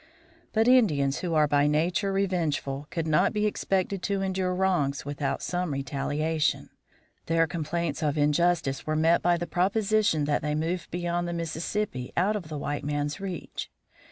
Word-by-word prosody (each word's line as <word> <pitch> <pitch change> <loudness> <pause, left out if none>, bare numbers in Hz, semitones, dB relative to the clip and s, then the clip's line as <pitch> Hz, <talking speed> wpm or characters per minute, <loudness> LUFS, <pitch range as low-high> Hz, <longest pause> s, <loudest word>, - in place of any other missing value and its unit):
But 225 +1 +2
Indians, 155 - +4
who 170 -3 -2
are 155 -1 +4
by 145 0 +3
nature 175 +7 +1
revengeful, 160 -7 -1
could 165 -2 -2
not 160 +5 +3
be 210 0 +1
expected 195 -2 0
to 195 0 -1
endure 190 -1 -1
wrongs 175 -8 0
without 145 0 -2
some 180 -3 -2
retaliation. 145 +3 -1 0.6
Their 165 0 +3
complaints 165 -1 -3
of 150 -1 0
injustice 150 -1 +1
were 155 - 0
met 165 +2 +3
by 175 0 +3
the 175 - -3
proposition 200 -3 +1
that 145 0 +1
they 150 0 -1
move 165 +3 -2
beyond 175 0 -2
the 175 - -3
Mississippi, 165 -3 -3
out 195 +5 +2
of 190 -6 -4
the 155 - -4
white 145 0 -3
man's 145 0 -2
reach. 190 -3 -5
165 Hz, 160 wpm, -27 LUFS, 150-185 Hz, 0.6 s, Indians